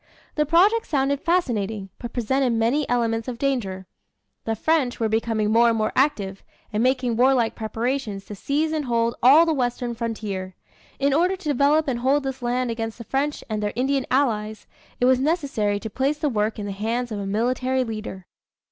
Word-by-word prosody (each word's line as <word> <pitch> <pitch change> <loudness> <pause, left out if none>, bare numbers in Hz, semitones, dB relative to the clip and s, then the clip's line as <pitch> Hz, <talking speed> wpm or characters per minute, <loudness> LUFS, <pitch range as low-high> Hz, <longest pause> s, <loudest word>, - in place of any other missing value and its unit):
The 300 -1 0
project 390 +8 +4
sounded 280 -1 0
fascinating, 220 - -1
but 240 - -6
presented 250 +1 0
many 235 +6 +1
elements 230 -1 0
of 245 -2 -4
danger. 225 -9 -2 0.6
The 225 - -1
French 275 0 +1
were 225 - +1
becoming 220 -1 0
more 235 +1 +5
and 230 - +1
more 215 0 0
active, 200 -9 0 0.3
and 210 - +1
making 255 -2 +1
warlike 250 -2 +3
preparations 225 -2 -3
to - - -8
seize 290 +9 -1
and 310 -2 -2
hold 235 -1 +1
all 285 +7 +7
the 325 - +1
western 245 -3 -1
frontier. 210 -5 -4 0.4
In 280 0 +1
order 355 +6 +2
to 370 -4 -10
develop 290 +3 +3
and 245 -3 -1
hold 270 +3 +2
this 265 -1 -4
land 245 0 -1
against 225 -1 -4
the 235 - -8
French 280 +6 -2
and 215 -2 -3
their 205 -1 -2
Indian 265 +2 0
allies, 220 -5 0 0.3
it 245 - +2
was 255 0 +4
necessary 270 - 0
to 220 - -6
place 275 +5 0
the 300 0 0
work 215 -2 -1
in 210 - -4
the 200 - -4
hands 230 +5 -2
of 210 - -3
a 200 - -4
military 255 +5 0
leader. 215 -5 -6
245 Hz, 190 wpm, -23 LUFS, 220-275 Hz, 0.6 s, all